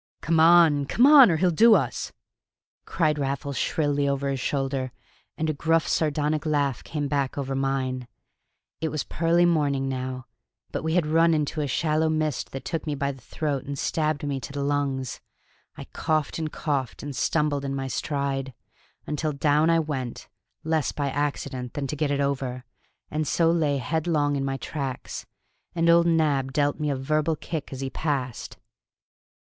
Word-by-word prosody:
"Come 165 Hz, 0 st, +1 dB
on, 160 Hz, -3 st, +6 dB
come 235 Hz, -, +3 dB
on, 280 Hz, -5 st, +9 dB
or 165 Hz, -, +2 dB
he'll 180 Hz, +2 st, +3 dB
do 220 Hz, +7 st, +6 dB
us!" -, -, -1 dB, 0.7 s
cried 155 Hz, -3 st, 0 dB
Raffles 140 Hz, 0 st, -2 dB
shrilly 145 Hz, +1 st, 0 dB
over 140 Hz, 0 st, -1 dB
his 135 Hz, -, -2 dB
shoulder; 135 Hz, -1 st, -1 dB, 0.5 s
and 160 Hz, -, -1 dB
a 155 Hz, -, 0 dB
gruff 165 Hz, +2 st, +1 dB
sardonic 150 Hz, -1 st, 0 dB
laugh 145 Hz, -5 st, 0 dB
came 150 Hz, -2 st, -3 dB
back 140 Hz, -2 st, -1 dB
over 135 Hz, -1 st, -2 dB
mine. 135 Hz, -2 st, -1 dB, 0.7 s
It 160 Hz, -, -1 dB
was 155 Hz, -3 st, -2 dB
pearly 170 Hz, +1 st, +2 dB
morning 145 Hz, -5 st, +1 dB
now, 130 Hz, -1 st, -4 dB, 0.5 s
but -, -, -3 dB
we 160 Hz, +1 st, 0 dB
had 180 Hz, -3 st, +3 dB
run 165 Hz, +1 st, +4 dB
into 150 Hz, +1 st, -1 dB
a 145 Hz, -, -1 dB
shallow 155 Hz, +3 st, +1 dB
mist 155 Hz, -3 st, -1 dB
that 135 Hz, -, -7 dB
took 165 Hz, -2 st, -3 dB
me 150 Hz, -, -1 dB
by 140 Hz, 0 st, -1 dB
the 135 Hz, -2 st, -13 dB
throat 140 Hz, +1 st, -3 dB
and 140 Hz, 0 st, -5 dB
stabbed 155 Hz, 0 st, -1 dB
me 140 Hz, -1 st, -2 dB
to 130 Hz, -, -8 dB
the 140 Hz, 0 st, -3 dB
lungs. 140 Hz, -3 st, -1 dB, 0.6 s
I -, -, -6 dB
coughed 155 Hz, 0 st, -1 dB
and 155 Hz, -1 st, -3 dB
coughed, 140 Hz, -7 st, -2 dB
and 145 Hz, -1 st, -5 dB
stumbled 150 Hz, 0 st, 0 dB
in 135 Hz, 0 st, -3 dB
my 135 Hz, -1 st, -3 dB
stride, 135 Hz, -1 st, -2 dB, 0.5 s
until 150 Hz, +1 st, -2 dB
down 150 Hz, +3 st, +2 dB
I 165 Hz, -, +4 dB
went, 135 Hz, -6 st, -4 dB, 0.4 s
less 160 Hz, -3 st, 0 dB
by 140 Hz, -2 st, -2 dB
accident 140 Hz, -3 st, -3 dB
than 145 Hz, -, -2 dB
to 145 Hz, -, -3 dB
get 150 Hz, 0 st, 0 dB
it 140 Hz, 0 st, 0 dB
over, 135 Hz, -2 st, -2 dB, 0.5 s
and 155 Hz, 0 st, -1 dB
so 165 Hz, -1 st, +3 dB
lay 155 Hz, -4 st, +1 dB
headlong 145 Hz, +2 st, 0 dB
in 135 Hz, -, -1 dB
my 135 Hz, 0 st, -2 dB
tracks. 135 Hz, -3 st, -5 dB, 0.5 s
And 170 Hz, 0 st, +4 dB
old 170 Hz, 0 st, +5 dB
Nab 145 Hz, -5 st, +1 dB
dealt 145 Hz, +1 st, +1 dB
me 150 Hz, -1 st, -1 dB
a 140 Hz, -, 0 dB
verbal 155 Hz, +4 st, 0 dB
kick 155 Hz, 0 st, -5 dB
as 135 Hz, -1 st, -6 dB
he 135 Hz, -1 st, -3 dB
passed. 135 Hz, -6 st, -3 dB
145 Hz, 175 wpm, -25 LUFS, 135-155 Hz, 0.7 s, on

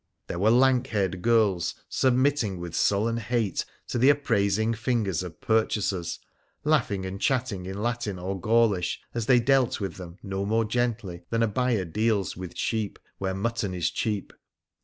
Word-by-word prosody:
There 85 Hz, -, -5 dB
were 105 Hz, +4 st, +4 dB
lank 130 Hz, +1 st, +4 dB
haired 95 Hz, -6 st, -1 dB
girls 110 Hz, -6 st, +2 dB
submitting 130 Hz, -6 st, +1 dB
with 85 Hz, -1 st, -6 dB
sullen 110 Hz, +6 st, +2 dB
hate 115 Hz, -2 st, -1 dB, 0.2 s
to -, -, -1 dB
the 130 Hz, +4 st, +6 dB
appraising 110 Hz, -6 st, +2 dB
fingers 115 Hz, -7 st, 0 dB
of 90 Hz, -3 st, -8 dB
purchasers 105 Hz, -5 st, 0 dB, 0.5 s
laughing 115 Hz, -11 st, +1 dB
and 95 Hz, +1 st, -6 dB
chatting 125 Hz, -9 st, 0 dB
in 100 Hz, +2 st, -4 dB
Latin 115 Hz, -5 st, -2 dB
or 95 Hz, +1 st, -4 dB
Gaulish, 110 Hz, -5 st, +2 dB
as 115 Hz, -2 st, -3 dB
they 125 Hz, -2 st, +6 dB
dealt 135 Hz, 0 st, +2 dB
with 100 Hz, -2 st, -4 dB
them 90 Hz, -1 st, -9 dB
no 95 Hz, -1 st, -3 dB
more 110 Hz, +2 st, +1 dB
gently 110 Hz, -6 st, -2 dB
than 115 Hz, 0 st, +1 dB
a -, -, +3 dB
buyer 115 Hz, -2 st, 0 dB
deals 105 Hz, +2 st, 0 dB
with 90 Hz, -1 st, -8 dB
sheep 110 Hz, -3 st, -1 dB, 0.2 s
when 95 Hz, -1 st, -2 dB
mutton 105 Hz, -2 st, -2 dB
is 85 Hz, -3 st, 0 dB
cheap. 105 Hz, -3 st, -2 dB
110 Hz, 160 wpm, -26 LUFS, 95-120 Hz, 0.5 s, the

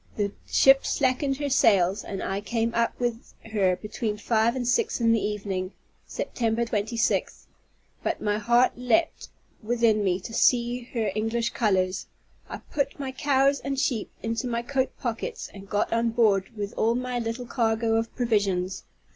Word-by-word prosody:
The 205 Hz, -1 st, 0 dB, 0.2 s
ship 270 Hz, 0 st, +5 dB
slackened 270 Hz, 0 st, 0 dB
her 290 Hz, 0 st, -2 dB
sails, 200 Hz, -7 st, +3 dB
and 195 Hz, -1 st, -5 dB
I 195 Hz, +1 st, -2 dB
came 230 Hz, +1 st, -1 dB
up 235 Hz, 0 st, 0 dB
with 240 Hz, -1 st, -3 dB, 0.2 s
her 190 Hz, -4 st, +3 dB
between 210 Hz, +2 st, -4 dB
five 225 Hz, +2 st, +1 dB
and 250 Hz, -2 st, -2 dB
six 405 Hz, -, +1 dB
in 230 Hz, -1 st, +3 dB
the 225 Hz, -2 st, +3 dB
evening, 195 Hz, -2 st, -3 dB, 0.3 s
September 230 Hz, 0 st, -1 dB
26th; 225 Hz, +1 st, -1 dB, 0.6 s
but -, -, -2 dB
my 210 Hz, 0 st, 0 dB
heart 240 Hz, +3 st, +4 dB
leaped 250 Hz, +7 st, 0 dB, 0.3 s
within 225 Hz, -2 st, +2 dB
me 185 Hz, -2 st, +1 dB
to 225 Hz, -, -8 dB
see 240 Hz, +1 st, +2 dB
her 220 Hz, -4 st, 0 dB
English 225 Hz, +2 st, -1 dB
colors. 190 Hz, -3 st, 0 dB, 0.4 s
I -, -, -7 dB
put 280 Hz, -1 st, -1 dB
my 270 Hz, -2 st, -3 dB
cows 275 Hz, +1 st, +2 dB
and 275 Hz, -1 st, -3 dB
sheep 255 Hz, -6 st, 0 dB
into 225 Hz, +2 st, -2 dB
my 235 Hz, -1 st, -2 dB
coat 260 Hz, +1 st, 0 dB
pockets, 360 Hz, -, -4 dB
and 195 Hz, 0 st, -11 dB
got 205 Hz, +2 st, 0 dB
on 230 Hz, 0 st, +2 dB
board 215 Hz, -5 st, +2 dB
with 205 Hz, -1 st, -4 dB
all 230 Hz, +1 st, +2 dB
my 250 Hz, 0 st, -2 dB
little 230 Hz, +2 st, -4 dB
cargo 225 Hz, -1 st, 0 dB
of 225 Hz, 0 st, 0 dB
provisions. 200 Hz, -6 st, 0 dB
230 Hz, 165 wpm, -26 LUFS, 210-245 Hz, 0.6 s, ship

